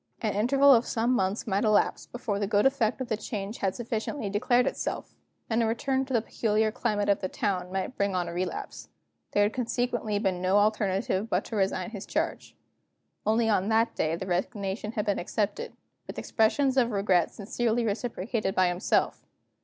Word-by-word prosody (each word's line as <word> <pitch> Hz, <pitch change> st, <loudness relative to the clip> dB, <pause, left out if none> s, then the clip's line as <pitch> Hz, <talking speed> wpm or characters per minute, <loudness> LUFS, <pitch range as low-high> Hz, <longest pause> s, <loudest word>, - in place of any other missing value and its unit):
An 215 Hz, -2 st, -1 dB
interval 275 Hz, +6 st, +5 dB
of 235 Hz, -1 st, +3 dB
some 235 Hz, +2 st, +1 dB
months 190 Hz, -2 st, 0 dB
might 200 Hz, 0 st, 0 dB
elapse 215 Hz, -2 st, +2 dB
before 220 Hz, -4 st, -3 dB
the 200 Hz, -, 0 dB
good 205 Hz, 0 st, +2 dB
effect 260 Hz, -2 st, +2 dB
of 260 Hz, -, -3 dB
the 225 Hz, -, 0 dB
change 210 Hz, 0 st, -5 dB
had 195 Hz, -1 st, 0 dB
sufficiently 225 Hz, -1 st, -3 dB
declared 240 Hz, +4 st, +3 dB
itself; -, -, -3 dB, 0.3 s
and 225 Hz, 0 st, +1 dB
a 225 Hz, -, +2 dB
return 265 Hz, +4 st, 0 dB
to 265 Hz, -, -6 dB
the 225 Hz, -, +2 dB
peculiar 215 Hz, -1 st, +1 dB
climate 215 Hz, -3 st, -1 dB
of 200 Hz, -, +3 dB
the 185 Hz, -, -3 dB
town 180 Hz, -2 st, -2 dB
might 190 Hz, +6 st, -3 dB
bring 200 Hz, -1 st, 0 dB
on 175 Hz, -1 st, 0 dB
a 170 Hz, -, -5 dB
relapse. 180 Hz, +2 st, -4 dB, 0.4 s
There 205 Hz, -, +4 dB
had 205 Hz, +2 st, +1 dB
consequently 240 Hz, -3 st, -1 dB
been 190 Hz, -4 st, -1 dB
no 185 Hz, +2 st, +3 dB
alternative 205 Hz, -1 st, +1 dB
to -, -, -16 dB
but -, -, -1 dB
resign 205 Hz, +1 st, 0 dB
his 205 Hz, -3 st, -7 dB
charge. -, -, -2 dB, 0.7 s
Only 225 Hz, +1 st, +3 dB
on 205 Hz, -2 st, +2 dB
that 225 Hz, +1 st, +2 dB
day 160 Hz, +1 st, 0 dB
the 180 Hz, -, -5 dB
resignation 195 Hz, +3 st, -2 dB
had 210 Hz, -2 st, -1 dB
been 205 Hz, -2 st, 0 dB
accepted 220 Hz, -, -2 dB, 0.4 s
with -, -, -8 dB
expressions 260 Hz, +4 st, +1 dB
of 240 Hz, -3 st, +4 dB
regret 195 Hz, -5 st, +2 dB
sincerely 230 Hz, +2 st, -1 dB
reciprocated 215 Hz, -1 st, -2 dB
by 185 Hz, -1 st, +4 dB
himself. 175 Hz, +2 st, 0 dB
215 Hz, 185 wpm, -28 LUFS, 195-235 Hz, 0.7 s, interval